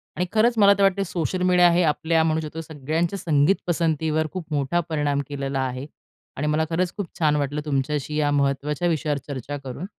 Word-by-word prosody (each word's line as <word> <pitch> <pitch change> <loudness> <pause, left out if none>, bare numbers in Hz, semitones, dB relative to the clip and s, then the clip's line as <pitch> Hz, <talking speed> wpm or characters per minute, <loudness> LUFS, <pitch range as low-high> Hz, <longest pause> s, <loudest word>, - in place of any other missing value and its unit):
आणि 180 - 0
खरंच 225 +3 +3
मला 200 -1 +7
तर 200 - +2
वाटते 195 0 +3
सोशल 175 +1 -2
मीडिया 180 -1 +5
हे 175 +1 +3
आपल्या 160 +1 +2
म्हणू 160 0 +1
शकतो 160 +1 -6
सगळ्यांच्या 160 +5 -2
संगीत 150 +3 +3
पसंतीवर 160 -2 0
खूप 185 -3 -5
मोठा 145 +4 0
परिणाम 145 -2 0
केलेला 140 -1 -3
आहे. 130 +1 -3 0.5
आणि 150 +2 -1
मला 155 +1 +1
खरंच 175 +2 -1
खूप 205 - -2
छान 150 -2 +3
वाटलं 145 +1 -1
तुमच्याशी 145 +1 -2
या 145 -1 +2
महत्त्वाच्या 145 +4 0
विषयावर 155 -3 0
चर्चा 140 0 -5
करून. 135 +6 -7
155 Hz, 185 wpm, -23 LUFS, 145-175 Hz, 0.5 s, मला